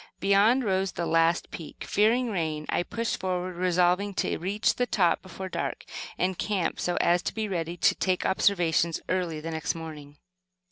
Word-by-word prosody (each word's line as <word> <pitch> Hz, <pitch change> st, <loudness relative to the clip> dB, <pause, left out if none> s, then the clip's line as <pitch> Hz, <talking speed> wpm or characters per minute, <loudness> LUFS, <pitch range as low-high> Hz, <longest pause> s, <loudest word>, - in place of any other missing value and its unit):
Beyond, 205 Hz, +6 st, +4 dB
rose 190 Hz, -3 st, 0 dB
the 170 Hz, -, -2 dB
last 165 Hz, +1 st, +2 dB
peak. 160 Hz, -, -8 dB
Fearing 230 Hz, +4 st, +2 dB
rain, 160 Hz, -5 st, -2 dB
I -, -, +1 dB
pushed 230 Hz, +6 st, -3 dB
forward, 185 Hz, -1 st, -2 dB
resolving 180 Hz, +2 st, +2 dB
to -, -, 0 dB
reach 200 Hz, +5 st, +1 dB
the 245 Hz, -, -1 dB
top 175 Hz, -7 st, +2 dB
before 190 Hz, 0 st, -7 dB
dark, -, -, -4 dB, 0.3 s
and 185 Hz, 0 st, -1 dB
camp, 200 Hz, -5 st, -1 dB
so 175 Hz, -, -1 dB
as 175 Hz, +1 st, +3 dB
to -, -, -4 dB
be 220 Hz, -1 st, -1 dB
ready 170 Hz, -3 st, -3 dB
to -, -, +4 dB
take 185 Hz, -1 st, 0 dB
observations 170 Hz, -4 st, +2 dB
early 175 Hz, -3 st, -1 dB
the 165 Hz, +1 st, -5 dB
next 160 Hz, 0 st, -2 dB
morning. 150 Hz, -3 st, -9 dB
180 Hz, 175 wpm, -27 LUFS, 165-200 Hz, 0.3 s, Beyond